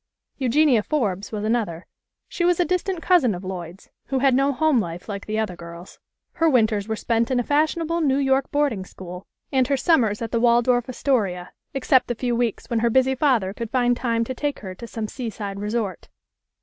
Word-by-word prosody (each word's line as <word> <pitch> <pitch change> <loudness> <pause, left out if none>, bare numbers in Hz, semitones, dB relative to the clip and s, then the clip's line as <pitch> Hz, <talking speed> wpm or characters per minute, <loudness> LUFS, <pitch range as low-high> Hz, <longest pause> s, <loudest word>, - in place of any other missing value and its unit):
Eugenia 260 -1 +3
Forbes 210 -7 -2
was 210 -2 -4
another. 215 -7 -1 0.4
She 345 - -3
was 355 0 +3
a 355 - +3
dis 365 0 +1
tant 375 -4 -4
cousin 295 - +4
of 180 - -8
Lloyd's, 180 -1 -7 0.2
who 270 - -1
had 265 0 +3
no 275 +2 +3
home 305 -1 +2
life 175 -3 -5
like 200 -2 -6
the 215 0 -2
other 215 -5 -1
girls. 170 +1 -11 0.3
Her 330 0 +2
winters 220 -6 +2
were 220 - -1
spent 230 +1 0
in 255 -2 +1
a - - 0
fashion 305 +5 +1
able 335 +1 -1
New 275 -3 +2
York 270 -1 +1
boarding 285 -9 0
school, 180 0 -10 0.2
and 260 -2 +2
her 280 0 +1
summers 250 -9 +2
at 230 - -4
the 230 - +1
Waldorf 240 +1 +3
Astoria, 205 -9 -1 0.2
except 265 -1 +3
the 240 - -2
few 245 0 -1
weeks 235 -3 -1
when 235 - 0
her 235 +1 +2
busy 260 +2 +3
father 250 -9 +1
could 230 +1 -5
find 245 -1 +2
time 230 -2 0
to 260 - -4
take 290 +2 -3
her 190 -2 -6
to 235 +5 -10
some 225 -1 -4
seaside 210 -5 -5
resort. 210 -3 -3
235 Hz, 210 wpm, -23 LUFS, 205-270 Hz, 0.4 s, cousin